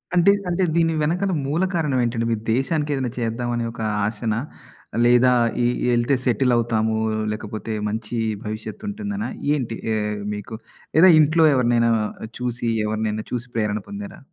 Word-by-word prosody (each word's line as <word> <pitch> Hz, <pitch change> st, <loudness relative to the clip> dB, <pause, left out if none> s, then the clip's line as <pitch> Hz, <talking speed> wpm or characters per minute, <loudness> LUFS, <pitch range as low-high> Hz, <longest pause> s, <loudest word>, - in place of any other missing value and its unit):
అంటే, 175 Hz, +3 st, +6 dB, 0.2 s
అంటే 175 Hz, +2 st, +1 dB
దీని 165 Hz, -1 st, +3 dB
వెనకాల 180 Hz, +5 st, 0 dB
మూల 155 Hz, +6 st, 0 dB
కారణం 150 Hz, -6 st, +1 dB
ఏంటండి? 115 Hz, -1 st, -1 dB
మీరు 110 Hz, -, -1 dB
దేశానికి 150 Hz, +3 st, 0 dB
ఏదైనా 130 Hz, -3 st, -2 dB
చేద్దాం 120 Hz, +1 st, -2 dB
అనే 120 Hz, 0 st, -1 dB
ఒక 115 Hz, -, -8 dB, 0.2 s
ఆశనా? 110 Hz, +1 st, -1 dB, 0.7 s
లేదా 125 Hz, +1 st, +5 dB, 0.3 s
ఈ -, -, +3 dB, 0.3 s
ఎళ్తే 120 Hz, +3 st, +2 dB
సెటిలవుతాము, 115 Hz, -2 st, +2 dB, 0.4 s
లేకపోతే 110 Hz, +1 st, -5 dB, 0.2 s
మంచి 110 Hz, +2 st, -4 dB, 0.3 s
భవిష్యత్తుంటుందనా 205 Hz, -, -4 dB, 0.2 s
ఏంటి? 120 Hz, -6 st, -2 dB, 0.2 s
ఏ -, -, +1 dB, 0.4 s
మీకు 105 Hz, +2 st, -6 dB, 0.4 s
లేదా 180 Hz, +4 st, +8 dB
ఇంట్లో 155 Hz, +2 st, +5 dB
ఎవరినైనా 120 Hz, -2 st, +3 dB, 0.5 s
చూసి 120 Hz, -1 st, -2 dB, 0.2 s
ఎవరినైనా 110 Hz, 0 st, -2 dB
చూసి 125 Hz, 0 st, -3 dB
ప్రేరణ 105 Hz, -1 st, 0 dB
పొందారా? 200 Hz, -2 st, -8 dB
120 Hz, 135 wpm, -22 LUFS, 110-160 Hz, 0.7 s, లేదా